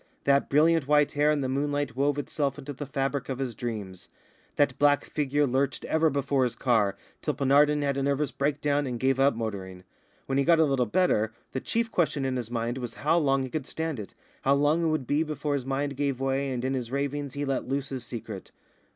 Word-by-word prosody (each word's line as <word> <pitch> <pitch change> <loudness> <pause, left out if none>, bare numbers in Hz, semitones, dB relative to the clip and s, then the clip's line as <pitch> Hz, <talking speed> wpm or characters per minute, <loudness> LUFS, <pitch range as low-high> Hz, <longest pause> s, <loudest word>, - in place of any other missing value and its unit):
That 140 0 +3
brilliant 155 0 +3
white 150 0 +4
hair 145 +1 +2
in 150 -1 +2
the 130 - -1
moonlight 145 +1 -1
wove 140 +2 +1
itself 145 -1 -2
into 145 0 -7
the 140 +1 -7
fabric 135 0 -2
of 130 - -2
his 130 -3 -3
dreams. 105 -5 -6 0.5
That 140 -3 +2
black 145 0 +4
figure 145 0 0
lurched 135 +1 0
ever 160 0 +2
before 140 -1 +1
his 125 - -1
car, 110 -6 +1 0.2
till 150 - -1
Penarden 145 +2 +4
had 140 -1 0
a - - 0
nervous 140 +1 0
breakdown 145 0 0
and 120 -2 -3
gave 135 +1 +1
up 140 -1 +4
motoring. 95 -5 -5 0.4
When 135 0 0
he - - +3
got 170 +3 +5
a 160 - +6
little 135 -4 +1
better, 110 - +2 0.2
the 130 - -3
chief 230 0 -1
question 150 -5 +1
in 130 -1 -1
his 120 -2 -4
mind 120 +1 -2
was 120 -2 -6
how 165 +3 +4
long 135 -3 +2
he 130 - -5
could 150 -4 -3
stand 160 -5 -3
it, 105 - -8 0.3
how 135 +1 +3
long 145 +4 +2
it - - +2
would 155 -4 -1
be 145 +5 +1
before 150 -2 -2
his 135 -2 -2
mind 140 +1 -1
gave 140 -2 -1
way 135 +1 0
and 125 -1 -3
in 135 - 0
his 125 -3 -3
ravings 140 0 -3
he 145 0 -2
let 135 -2 -2
loose 135 +1 -2
his 130 -3 -5
secret. 115 -5 -7
140 Hz, 225 wpm, -27 LUFS, 130-145 Hz, 0.5 s, a